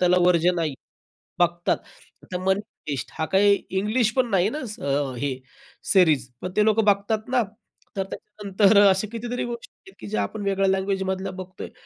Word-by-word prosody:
त्याला 180 Hz, 0 st, +4 dB
वर्ज्य 175 Hz, 0 st, +4 dB
नाही. 160 Hz, -4 st, -1 dB, 0.7 s
बघतात. 175 Hz, 0 st, +2 dB, 0.5 s
आता 180 Hz, -, -5 dB
Money 190 Hz, +1 st, +2 dB, 0.3 s
Heist 140 Hz, -, -3 dB
हा 160 Hz, -, 0 dB
काही 200 Hz, +1 st, +5 dB, 0.2 s
इंग्लिश 215 Hz, +2 st, +1 dB
पण 255 Hz, -2 st, +2 dB
नाही 190 Hz, 0 st, +3 dB
ना, 295 Hz, -, -4 dB, 0.3 s
अ, 140 Hz, -1 st, 0 dB
ही 130 Hz, 0 st, -2 dB, 0.5 s
सिरीज 155 Hz, -, +4 dB
पण 180 Hz, -, -4 dB
ते 210 Hz, -, +4 dB
लोक 220 Hz, 0 st, +3 dB
बघतात 205 Hz, +2 st, +1 dB
ना? 250 Hz, -1 st, +3 dB, 0.6 s
तर 195 Hz, -, +1 dB
त्याच्यानंतर 205 Hz, 0 st, +1 dB
अशा 195 Hz, +2 st, +2 dB
कितीतरी 240 Hz, +2 st, -3 dB
गोष्टी 235 Hz, -1 st, -7 dB, 0.2 s
आहेत, 385 Hz, -, -15 dB
की -, -, -8 dB
ज्या 215 Hz, -, -1 dB
आपण 215 Hz, -, -5 dB
वेगळ्या 195 Hz, 0 st, +1 dB
लँग्वेजमधल्या 190 Hz, 0 st, -1 dB
बघतो 185 Hz, 0 st, -8 dB
आहे. -, -, -8 dB
195 Hz, 170 wpm, -24 LUFS, 180-215 Hz, 0.7 s, काही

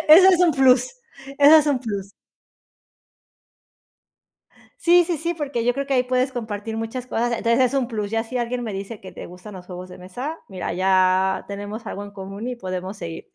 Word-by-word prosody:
Eso 365 Hz, +5 st, +9 dB
es 360 Hz, -1 st, +3 dB
un 345 Hz, -3 st, +5 dB
plus 255 Hz, -2 st, +4 dB, 0.5 s
eso 290 Hz, +2 st, +8 dB
es 300 Hz, -, +1 dB
un 280 Hz, -3 st, +2 dB
plus. 200 Hz, -5 st, -5 dB, 2.7 s
Sí 350 Hz, +1 st, +5 dB
sí 340 Hz, -2 st, -1 dB
sí, 340 Hz, +3 st, -2 dB
porque 285 Hz, -7 st, -3 dB
yo 245 Hz, -, +3 dB
creo 275 Hz, 0 st, -3 dB
que 275 Hz, -, 0 dB
ahí 250 Hz, -, +3 dB
puedes 255 Hz, +1 st, 0 dB
compartir 220 Hz, -2 st, -5 dB
muchas 235 Hz, +3 st, -5 dB
cosas, 240 Hz, +1 st, -1 dB
entonces, 235 Hz, +1 st, +1 dB
es 255 Hz, +1 st, +2 dB
un 265 Hz, -3 st, +1 dB
plus, 210 Hz, -3 st, -4 dB
ya 225 Hz, 0 st, 0 dB
si 250 Hz, +2 st, -5 dB
alguien 245 Hz, +1 st, -2 dB
me 215 Hz, -3 st, -4 dB
dice 200 Hz, +3 st, -6 dB
que 190 Hz, -, -11 dB
te -, -, -9 dB
gustan 180 Hz, +4 st, -11 dB
los 180 Hz, -1 st, -10 dB
juegos 180 Hz, 0 st, -8 dB
de 180 Hz, -, -11 dB
mesa, 245 Hz, -, -6 dB
mira, 185 Hz, -3 st, -4 dB
ya 185 Hz, 0 st, +2 dB
tenemos 205 Hz, +3 st, -6 dB
algo 200 Hz, -, -5 dB
en 205 Hz, -, -10 dB
común 200 Hz, +3 st, -7 dB
y 250 Hz, -, -3 dB
podemos 185 Hz, -1 st, -5 dB
seguir. 165 Hz, -2 st, -7 dB
225 Hz, 200 wpm, -22 LUFS, 195-255 Hz, 2.7 s, Eso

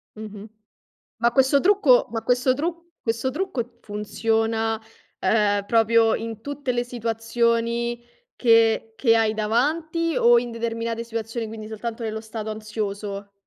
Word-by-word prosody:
Mh-mh. 215 Hz, 0 st, -9 dB, 0.7 s
Ma 235 Hz, +1 st, +3 dB
questo 265 Hz, +2 st, +4 dB
trucco 360 Hz, -10 st, +4 dB
ma 225 Hz, -1 st, -3 dB
questo 250 Hz, +2 st, +2 dB
tru 335 Hz, +4 st, -3 dB, 0.2 s
questo 230 Hz, +3 st, -1 dB
trucco 250 Hz, -8 st, -4 dB
funziona, 225 Hz, +1 st, -1 dB, 0.4 s
uhm, 205 Hz, -2 st, +2 dB
proprio 225 Hz, 0 st, +4 dB
in 225 Hz, -1 st, -5 dB
tutte 285 Hz, 0 st, -3 dB
le 240 Hz, 0 st, 0 dB
situazioni 235 Hz, 0 st, -1 dB, 0.3 s
che 225 Hz, -1 st, +3 dB
che 230 Hz, -3 st, +4 dB
hai 220 Hz, -1 st, +2 dB
davanti, 315 Hz, +10 st, 0 dB
o 240 Hz, 0 st, +6 dB
in 240 Hz, 0 st, -3 dB
determinate 230 Hz, 0 st, -3 dB
situazioni, 230 Hz, 0 st, -4 dB
quindi, 215 Hz, 0 st, -8 dB
soltanto 225 Hz, +2 st, -5 dB
nello 220 Hz, -1 st, -3 dB
stato 220 Hz, -1 st, -6 dB
ansioso? 205 Hz, -2 st, -5 dB
230 Hz, 130 wpm, -24 LUFS, 220-240 Hz, 0.7 s, o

